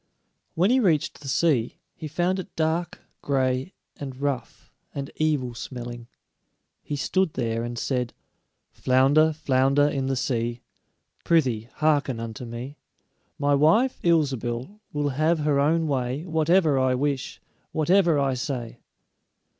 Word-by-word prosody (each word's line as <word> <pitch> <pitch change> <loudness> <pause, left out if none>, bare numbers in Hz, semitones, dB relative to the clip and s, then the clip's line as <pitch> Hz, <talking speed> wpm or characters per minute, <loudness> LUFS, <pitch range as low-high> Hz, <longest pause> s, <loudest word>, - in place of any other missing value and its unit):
When 185 +7 +3
he 260 - +4
reached 170 - +1
the 140 - -9
sea, 135 -4 +1 0.2
he 155 - -7
found 175 +5 0
it 185 - -8
dark, 165 +2 -1 0.2
gray, 130 +3 0 0.2
and 135 -2 -7
rough, 140 -3 -4 0.2
and 140 -1 -5
evil 145 -6 0
smelling. 120 -1 -7 0.7
He 145 - -4
stood 170 +4 0
there 115 -2 -1
and 120 0 -5
said: 125 -1 -1 0.6
"Flounder, 135 +5 +3
flounder 140 -1 +2
in 135 -2 -1
the 135 - 0
sea, 120 -2 -2 0.6
Prythee, 125 -9 +1
hearken 145 -5 +1
unto 115 +1 -6
me: 120 +5 -7 0.6
My 145 0 +2
wife, 165 - +3
Ilsebil, 140 - 0
will 145 -1 -1
have 155 +5 +1
her 145 -2 +2
own 160 +3 +2
way 135 +2 -2
Whatever 160 -2 +3
I 130 -1 +2
wish, 140 0 -2 0.3
whatever 170 0 +3
I 140 -1 +1
say." 125 -2 -4
140 Hz, 130 wpm, -25 LUFS, 125-160 Hz, 0.7 s, he